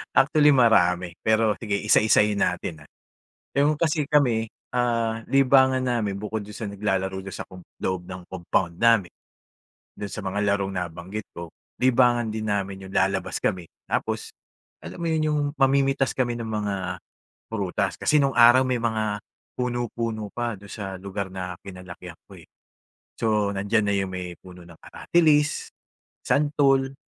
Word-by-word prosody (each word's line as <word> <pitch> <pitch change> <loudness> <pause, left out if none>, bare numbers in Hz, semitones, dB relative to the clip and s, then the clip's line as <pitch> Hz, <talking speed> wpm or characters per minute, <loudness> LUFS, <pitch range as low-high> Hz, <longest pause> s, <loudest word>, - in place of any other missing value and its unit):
Actually 150 +2 +5
marami 90 -8 +3
pero 110 -1 +3
sige 105 -3 -2
isa 105 - +4
isahin 105 -1 +3
natin, 85 -3 -3
ah. - - -24 0.7
Yung 145 +2 +3
kasi 155 -2 +1
kami, 120 -7 +2 0.3
ah, 115 -2 0
libangan 130 -1 +4
namin 115 -6 -1
bukod 105 0 -4
dun 105 - -11
sa 110 - -4
naglalaro 95 -1 -2
doon 100 - -7
sa - - -6
com 95 -1 -12 0.2
loob 95 -1 -2
ng 90 -1 -7
compound 85 -1 -1
namin, 115 -7 +4 0.9
do'n 100 -1 -6
sa - - -5
mga 95 +2 -2
larong 100 -1 -2
nabanggit 90 +4 -5
ko 85 -1 -7 0.3
libangan 120 -2 +3
din 110 0 -4
namin 100 -2 -2
'yong 95 - -11
lalabas 95 -1 0
kami 90 -2 -1 0.2
tapos - - -2 0.5
alam - - -8
mo 170 - -3
'yon 155 -1 +1
'yong 150 -1 +1 0.2
mamimitas 135 -1 +2
kami 120 -2 0
ng 115 - -5
mga 100 -4 -3 0.5
prutas. 100 -3 -1
Kasi 150 - +3
nung 135 -1 +1
araw, 120 +2 +7
may 130 -1 0
mga 110 -2 -1 0.4
puno, 120 -1 -1
puno 110 -3 -3
pa 120 -2 -2
do'n 100 +1 -14
sa 100 -3 -6
lugar 100 -1 -4
na 90 -2 -5
kinalakihan 90 -2 -10
ko, - - -13
eh. - - -16 0.7
So, 105 -3 +1
nandiyan 100 +2 +1
na 100 - +1
'yong 95 -1 -1
may 90 -1 -5
puno 90 -1 -13
ng 85 -2 -15
aratilis, 150 -3 +2 0.5
santol, 135 -2 +2
110 Hz, 155 wpm, -24 LUFS, 95-125 Hz, 0.9 s, araw